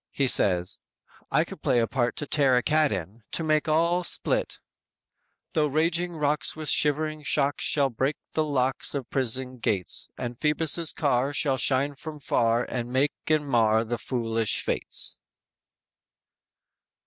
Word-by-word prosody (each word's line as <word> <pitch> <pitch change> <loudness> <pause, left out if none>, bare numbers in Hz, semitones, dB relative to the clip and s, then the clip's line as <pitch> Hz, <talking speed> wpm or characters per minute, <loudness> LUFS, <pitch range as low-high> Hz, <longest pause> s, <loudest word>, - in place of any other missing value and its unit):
He 140 - 0
says: 90 -7 +2 0.5
_"I - - +3
could - - -11
play 125 - +1
a 115 - +3
part 120 0 -1
to 150 - -3
tear 135 -3 +3
a 125 - +1
cat 155 +1 +2
in, 95 +4 -5
to 165 - -1
make 155 -1 +1
all 170 +3 +2
split" - - +2 1.0
"Tho 150 -1 +2
raging 170 +4 0
rocks, 150 0 0
With 155 -2 -3
shivering 155 +1 +1
shocks, 145 -1 0
Shall 140 -3 +2
break 135 +6 -1 0.2
the 155 - 0
locks 135 -2 -1
Of 135 -4 -5
prison 130 0 0
gates; 95 -5 0
And 120 0 -5
Phoebus' 155 +4 +1
car 140 -1 0
Shall 135 -2 +1
shine 140 +2 +2
from 150 +2 -9
far 115 -3 +1
And 120 -1 -5
make 135 +3 +1
and 155 -2 +1
mar 110 -3 +3
The 115 +1 -4
foolish 115 -3 -1
fates!" - - -1
140 Hz, 150 wpm, -26 LUFS, 120-155 Hz, 1.0 s, I